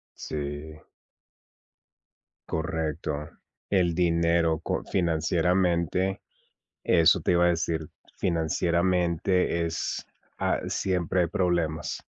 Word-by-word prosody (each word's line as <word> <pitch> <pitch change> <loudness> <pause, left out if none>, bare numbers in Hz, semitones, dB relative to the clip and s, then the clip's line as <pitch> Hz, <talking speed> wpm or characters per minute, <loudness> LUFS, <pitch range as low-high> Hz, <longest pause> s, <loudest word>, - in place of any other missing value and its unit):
Sí. 75 +1 -6 1.7
Correcto. 80 -3 -3 0.4
El 90 -4 +2
dinero 85 -1 +2
con - - -2
financieramente, 90 +2 +1 0.6
eso 85 -2 +5
te - - +1
iba 85 0 +4
a - - +5
decir. 80 -2 -1 0.3
Financieramente 85 +1 +1
es 80 0 -3 0.3
ah, - - 0
siempre 90 -1 0
hay 85 - +2
problemas. 85 -4 -1
85 Hz, 85 wpm, -27 LUFS, 80-90 Hz, 1.7 s, eso